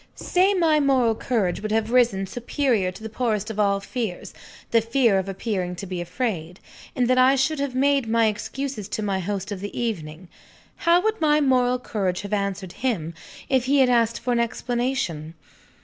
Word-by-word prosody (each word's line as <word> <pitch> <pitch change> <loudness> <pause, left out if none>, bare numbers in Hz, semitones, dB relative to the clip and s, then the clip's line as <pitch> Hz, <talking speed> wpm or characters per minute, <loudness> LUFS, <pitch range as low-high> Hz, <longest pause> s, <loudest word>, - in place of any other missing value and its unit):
Say 375 +3 +2
that - - 0
my 315 -3 +4
moral 260 -5 +3
courage 215 -6 -1
would 215 0 -4
have 220 +1 0
risen 235 -6 +3
superior 235 -2 -1
to 200 - -12
the - - -4
poorest 220 -2 -1
of 215 - -6
all 200 -1 +2
fears, 195 -2 -5 0.4
the 230 - +4
fear 230 -3 +2
of 190 +1 -4
appearing 190 -2 -3
to 190 - -7
be 180 -2 -4
afraid, 180 -2 -3 0.4
and 250 -1 +1
that 255 +1 +3
I 260 +2 +6
should 275 +3 0
have 280 -2 -2
made 275 -1 +2
my 230 0 +3
excuses 220 +1 -3
to 215 - -4
my 195 -2 -1
host 195 +2 -4
of 200 - -4
the 205 +1 -6
evening 175 -7 -4 0.5
how 340 +1 +3
would 440 -2 -1
my 300 -1 +4
moral 255 -3 +2
courage 195 -7 -2
have 200 +1 -6
answered 200 -2 -2
him, 185 -11 -1 0.3
if 260 -2 +1
he 280 +2 +3
had 260 -2 +5
asked 230 -2 +2
for 245 - -1
an 235 - +1
explanation? 235 - -2
225 Hz, 195 wpm, -24 LUFS, 195-255 Hz, 0.5 s, I